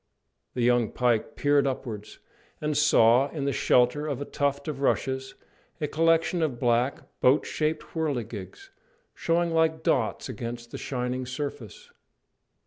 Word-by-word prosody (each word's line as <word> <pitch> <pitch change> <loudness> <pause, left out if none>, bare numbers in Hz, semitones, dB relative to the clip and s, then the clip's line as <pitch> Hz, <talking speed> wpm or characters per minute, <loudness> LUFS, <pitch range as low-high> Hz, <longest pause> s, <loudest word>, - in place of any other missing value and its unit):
The 125 - 0
young 120 -2 +3
pike 125 +2 0
peered 145 -1 +3
upwards, 115 -6 -5 0.4
and 150 0 -1
saw 130 -2 +5
in 145 -3 -4
the 140 - 0
shelter 130 +3 +2
of 140 -4 -3
a 145 - -4
tuft 140 0 -1
of 145 -3 -4
rushes 135 -1 -1 0.4
a 150 - -1
collection 165 +2 +2
of 140 -7 -1
black, 120 +2 +1 0.2
boat 130 +4 +4
shaped 155 0 -1
whirligigs, 140 - -4 0.4
showing 170 0 0
like 160 -1 +1
dots 125 -9 0
against 120 -1 -6
the - - -6
shining 125 -1 -3
surface. 140 -3 -6
135 Hz, 135 wpm, -27 LUFS, 120-150 Hz, 0.4 s, saw